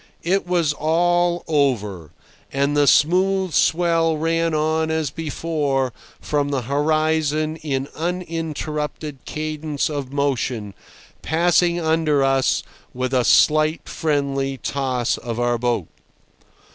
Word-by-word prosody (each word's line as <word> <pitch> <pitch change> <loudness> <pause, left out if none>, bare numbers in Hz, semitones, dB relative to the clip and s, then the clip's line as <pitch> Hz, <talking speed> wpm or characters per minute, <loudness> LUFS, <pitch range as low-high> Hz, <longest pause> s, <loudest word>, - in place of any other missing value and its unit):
It 185 +2 0
was 170 -4 +1
all 175 +3 +1
over, 110 - 0 0.4
and 140 +1 0
the 145 -1 +3
smooth 185 +4 +3
swell 165 -1 +2
ran 165 +1 0
on 160 +1 +1
as 160 -4 -1
before 145 -4 -2 0.3
from 145 -1 -1
the 135 -3 -1
horizon 155 +2 0
in 140 -3 -3
uninterrupted 155 -4 -4
cadence 155 -1 -3
of 140 -3 -4
motion, 130 -7 -1 0.5
passing 175 +1 +2
under 160 -3 +2
us 135 -1 +2 0.3
with 130 +1 -2
a 125 -1 +3
slight 155 +5 +3
friendly 140 -3 -1
toss 130 -3 -1
of 120 -1 -5
our 120 -1 +1
boat. 120 -7 -1
150 Hz, 110 wpm, -21 LUFS, 135-165 Hz, 0.5 s, the